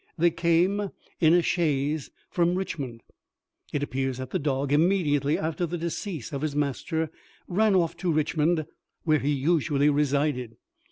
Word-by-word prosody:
They 170 Hz, +1 st, +4 dB
came 175 Hz, +5 st, +2 dB, 0.3 s
in 160 Hz, 0 st, +5 dB
a 175 Hz, -, +4 dB
chaise 150 Hz, -4 st, 0 dB, 0.2 s
from 175 Hz, 0 st, +2 dB
Richmond. 140 Hz, -11 st, -4 dB, 0.7 s
It 145 Hz, -, -1 dB
appears 135 Hz, -2 st, -2 dB
that 130 Hz, -1 st, -6 dB
the -, -, 0 dB
dog, 140 Hz, -1 st, 0 dB
immediately 150 Hz, -3 st, +2 dB
after 160 Hz, +2 st, -2 dB
the 175 Hz, +2 st, -3 dB
decease 170 Hz, -, -4 dB
of 140 Hz, -, -3 dB
his 150 Hz, -2 st, -2 dB
master, 150 Hz, +3 st, -1 dB, 0.4 s
ran 205 Hz, +2 st, +3 dB
off 170 Hz, -3 st, +2 dB
to 180 Hz, -2 st, 0 dB
Richmond, 155 Hz, +1 st, +1 dB, 0.4 s
where 155 Hz, -2 st, +3 dB
he 140 Hz, -, -1 dB
usually 145 Hz, 0 st, +2 dB
resided. 140 Hz, -4 st, 0 dB
155 Hz, 150 wpm, -26 LUFS, 140-170 Hz, 0.7 s, in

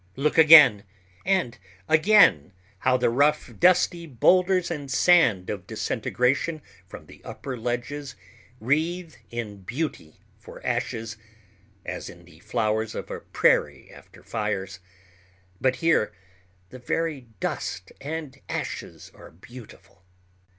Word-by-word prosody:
Look 145 Hz, +3 st, 0 dB
again 150 Hz, -10 st, +8 dB, 0.4 s
and 175 Hz, -, 0 dB, 0.3 s
again 155 Hz, -, +4 dB, 0.3 s
how 130 Hz, +4 st, +2 dB
the 125 Hz, -, +1 dB
rough, 145 Hz, +5 st, +1 dB
dusty 175 Hz, -1 st, +3 dB
boulders 180 Hz, +7 st, +2 dB
and 145 Hz, -4 st, -5 dB
sand 125 Hz, -, +3 dB
of 100 Hz, -4 st, -7 dB
disintegration 140 Hz, +5 st, -1 dB, 0.2 s
from -, -, -11 dB
the -, -, -16 dB
upper 135 Hz, -2 st, -7 dB
ledges 125 Hz, +4 st, -4 dB, 0.4 s
wreathe 160 Hz, +7 st, -1 dB, 0.2 s
in 105 Hz, -4 st, -6 dB
beauty 120 Hz, -, -5 dB, 0.2 s
for -, -, -13 dB
ashes—as 110 Hz, -3 st, -6 dB
in 85 Hz, 0 st, -14 dB
the 80 Hz, -2 st, -19 dB
flowers 110 Hz, +1 st, -2 dB
of -, -, -6 dB
a -, -, -5 dB
prairie -, -, 0 dB
after -, -, -17 dB
fires—but 95 Hz, 0 st, -5 dB
here 165 Hz, -10 st, +1 dB, 0.6 s
the 130 Hz, -, -10 dB
very 145 Hz, 0 st, -3 dB
dust 95 Hz, 0 st, -4 dB
and 145 Hz, -2 st, -6 dB
ashes -, -, -6 dB
are -, -, -14 dB
beautiful. 95 Hz, -1 st, -15 dB
120 Hz, 110 wpm, -25 LUFS, 100-155 Hz, 0.6 s, again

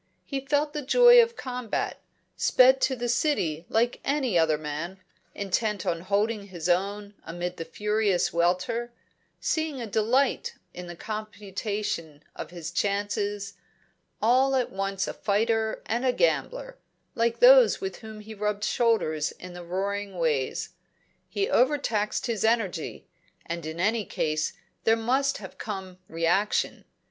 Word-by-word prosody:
He 275 Hz, -, -3 dB
felt 295 Hz, +1 st, 0 dB
the 300 Hz, -, -3 dB
joy 485 Hz, -, +7 dB
of 465 Hz, 0 st, 0 dB
combat; 250 Hz, -, -3 dB, 0.3 s
sped 260 Hz, +1 st, +5 dB
to 260 Hz, -, +2 dB
the 240 Hz, -1 st, -3 dB
City 185 Hz, -, 0 dB
like 235 Hz, +2 st, +1 dB
any 270 Hz, -7 st, 0 dB
other 160 Hz, -2 st, +3 dB
man, 155 Hz, +5 st, -5 dB, 0.4 s
intent 205 Hz, 0 st, -1 dB
on 170 Hz, -2 st, -1 dB
holding 205 Hz, +2 st, 0 dB
his 175 Hz, -3 st, -5 dB
own 200 Hz, +3 st, 0 dB
amid 175 Hz, +2 st, -5 dB
the 165 Hz, -, -5 dB
furious 210 Hz, -2 st, 0 dB
welter, 185 Hz, +8 st, 0 dB, 0.5 s
seeing 315 Hz, -4 st, -1 dB
a 235 Hz, -, -4 dB
delight 230 Hz, +6 st, +1 dB, 0.2 s
in 180 Hz, 0 st, -8 dB
the 175 Hz, -, -7 dB
computation 205 Hz, -6 st, -4 dB
of -, -, -6 dB
his 175 Hz, -2 st, -7 dB
chances; 205 Hz, 0 st, -1 dB, 0.7 s
at 260 Hz, +2 st, +3 dB
once 195 Hz, 0 st, -2 dB
a -, -, -3 dB
fighter 220 Hz, +1 st, 0 dB
and 235 Hz, +3 st, -1 dB
a 255 Hz, -1 st, +2 dB
gambler, -, -, 0 dB, 0.3 s
like 230 Hz, 0 st, +1 dB
those -, -, +7 dB
with 385 Hz, -1 st, -4 dB
whom 220 Hz, -1 st, -10 dB
he 220 Hz, +1 st, -9 dB
rubbed 210 Hz, 0 st, -2 dB
shoulders 215 Hz, -10 st, +1 dB
in 180 Hz, 0 st, -11 dB
the 175 Hz, 0 st, -8 dB
roaring 195 Hz, +2 st, -3 dB
ways. 150 Hz, -6 st, 0 dB, 0.6 s
He 400 Hz, 0 st, -1 dB
overtaxed 245 Hz, -5 st, +1 dB
his 230 Hz, -5 st, -1 dB
energy, 220 Hz, -7 st, 0 dB, 0.4 s
and 170 Hz, -1 st, -5 dB
in 160 Hz, +1 st, -6 dB
any 210 Hz, +3 st, +1 dB
case 155 Hz, -2 st, -1 dB, 0.3 s
there 225 Hz, -, +4 dB
must 260 Hz, +5 st, +1 dB
have -, -, -11 dB
come 190 Hz, -4 st, -6 dB
reaction. 170 Hz, +6 st, 0 dB
210 Hz, 140 wpm, -27 LUFS, 180-245 Hz, 0.7 s, joy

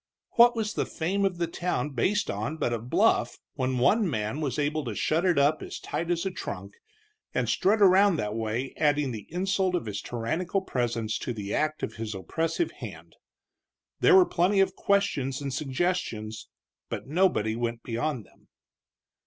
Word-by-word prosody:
What 240 Hz, +1 st, +6 dB
was 220 Hz, -1 st, -2 dB
the -, -, -1 dB
fame 195 Hz, +5 st, -1 dB
of 185 Hz, -3 st, 0 dB
the 170 Hz, -, 0 dB
town 165 Hz, -4 st, -2 dB
based 190 Hz, -, +1 dB
upon 110 Hz, +10 st, -3 dB
but 120 Hz, -, 0 dB
a 115 Hz, -, -1 dB
bluff 120 Hz, +2 st, +2 dB, 0.2 s
when 130 Hz, 0 st, -1 dB
one 200 Hz, -, +3 dB
man 110 Hz, +3 st, -2 dB
was 140 Hz, -5 st, -2 dB
able 150 Hz, +1 st, 0 dB
to 115 Hz, -4 st, -4 dB
shut 160 Hz, -, +1 dB
it 180 Hz, -4 st, +3 dB
up 145 Hz, +2 st, +3 dB
as -, -, -6 dB
tight 170 Hz, -, -4 dB
as 175 Hz, +1 st, 0 dB
a 190 Hz, -, -1 dB
trunk, -, -, -6 dB, 0.6 s
and -, -, +1 dB
strut 210 Hz, +2 st, +3 dB
around 195 Hz, 0 st, +6 dB
that 105 Hz, -8 st, -2 dB
way 115 Hz, +4 st, -2 dB
adding 145 Hz, -3 st, +2 dB
the 110 Hz, -3 st, -7 dB
insult 190 Hz, +1 st, 0 dB
of 170 Hz, -, -2 dB
his 100 Hz, -2 st, -4 dB
tyrannical 160 Hz, -, -2 dB
presence 115 Hz, -, -2 dB
to 120 Hz, -, -3 dB
the 105 Hz, -2 st, -5 dB
act 155 Hz, 0 st, -1 dB
of 115 Hz, -, -4 dB
his 110 Hz, -2 st, -4 dB
oppressive 165 Hz, -, -1 dB
hand. -, -, -10 dB, 0.8 s
There 400 Hz, -, +6 dB
were 375 Hz, -1 st, +8 dB
plenty 190 Hz, -, +2 dB
of 190 Hz, -1 st, +2 dB
questions 165 Hz, -10 st, +1 dB
and 140 Hz, -2 st, -4 dB
suggestions, 135 Hz, -7 st, -2 dB, 0.4 s
but -, -, -4 dB
nobody 145 Hz, -, +2 dB
went 115 Hz, 0 st, -3 dB
beyond 120 Hz, 0 st, -2 dB
them. -, -, -26 dB
150 Hz, 180 wpm, -27 LUFS, 115-185 Hz, 0.8 s, were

